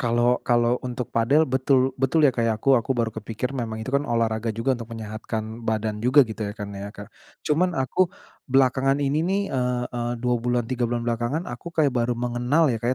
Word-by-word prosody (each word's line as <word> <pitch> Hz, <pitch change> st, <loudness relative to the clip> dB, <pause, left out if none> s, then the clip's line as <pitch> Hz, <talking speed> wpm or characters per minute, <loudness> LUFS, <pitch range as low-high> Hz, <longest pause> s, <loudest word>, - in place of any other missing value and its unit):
kalo 120 Hz, 0 st, +2 dB
kalo 120 Hz, 0 st, +2 dB
untuk 125 Hz, -1 st, -5 dB
padel 135 Hz, +7 st, +3 dB
betul 130 Hz, -1 st, +2 dB
betul 150 Hz, +4 st, +3 dB
ya 140 Hz, -, +5 dB
kayak 115 Hz, -2 st, 0 dB
aku 135 Hz, +5 st, +2 dB
aku 130 Hz, +1 st, +2 dB
baru 115 Hz, -2 st, 0 dB
kepikir 110 Hz, +4 st, -4 dB
memang 110 Hz, -4 st, -4 dB
itu 130 Hz, -, -6 dB
kan 140 Hz, +1 st, +1 dB
olahraga 115 Hz, -1 st, 0 dB
juga 115 Hz, +4 st, 0 dB
untuk 115 Hz, -3 st, -5 dB
menyehatkan 110 Hz, +1 st, -5 dB
badan 110 Hz, -2 st, -2 dB
juga 130 Hz, +5 st, +5 dB
gitu 110 Hz, -1 st, -8 dB
ya 105 Hz, 0 st, -3 dB
kan 100 Hz, -2 st, -6 dB
ya, 100 Hz, 0 st, -6 dB
Kak. 100 Hz, -1 st, -11 dB, 0.3 s
Cuman, 170 Hz, +3 st, +1 dB
aku 150 Hz, +8 st, +1 dB, 0.4 s
belakangan 135 Hz, +1 st, +3 dB
ini 145 Hz, +1 st, 0 dB
nih, 190 Hz, +4 st, +1 dB
eee 125 Hz, -1 st, 0 dB
eee, 120 Hz, 0 st, -2 dB
2 125 Hz, +1 st, 0 dB
bulan 120 Hz, 0 st, 0 dB
3 120 Hz, 0 st, -1 dB
bulan 120 Hz, 0 st, -2 dB
belakangan, 120 Hz, +7 st, -1 dB
aku 120 Hz, +3 st, -7 dB
kayak 155 Hz, -5 st, +1 dB
baru 120 Hz, -1 st, 0 dB
mengenal 125 Hz, +5 st, +1 dB
ya 115 Hz, -, -3 dB
Kak, 120 Hz, -, -1 dB
120 Hz, 205 wpm, -24 LUFS, 115-135 Hz, 0.4 s, ya